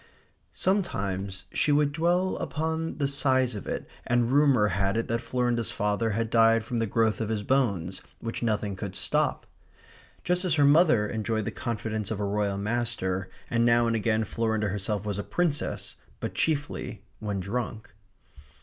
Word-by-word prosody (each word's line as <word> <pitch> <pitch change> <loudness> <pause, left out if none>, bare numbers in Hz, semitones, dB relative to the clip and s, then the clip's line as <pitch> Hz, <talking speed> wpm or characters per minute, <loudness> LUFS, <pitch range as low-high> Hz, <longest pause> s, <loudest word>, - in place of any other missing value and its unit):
Sometimes 100 - -1
she 150 - +2
would 145 0 +3
dwell 175 +4 +1
upon 160 +1 -2
the 140 -2 +1
size 130 -3 +2
of 105 - -7
it, - - -3 0.2
and 120 0 +1
rumour 135 -7 +4
had 95 +2 0
it 115 - -1
that 115 0 0
Florinda's 120 -1 0
father 105 +2 0
had 115 +1 -1
died 115 -1 +5
from 120 +1 -2
the 115 - 0
growth 110 +1 +1
of 110 - -2
his 110 -2 -1
bones 100 -8 0 0.2
which 115 0 -4
nothing 105 -3 0
could 95 0 -6
stop; - - +1 0.8
just 180 +1 +1
as 180 -4 +1
her 145 -2 +4
mother 145 -7 +5
enjoyed 110 -1 -2
the - - -2
confidence 110 -3 -3
of 110 - -3
a 105 - 0
Royal 100 -1 0
master, 100 -4 -1 0.2
and 115 -1 +1
now 120 0 +4
and 115 0 +1
again 110 0 +1
Florinda 110 -1 -1
herself 105 +1 -2
was 105 -1 -2
a - - -2
Princess, 165 - -2 0.2
but - - -4
chiefly 145 -3 -1 0.2
when 105 -2 -2
drunk. 110 +3 -4
115 Hz, 165 wpm, -27 LUFS, 105-130 Hz, 0.8 s, died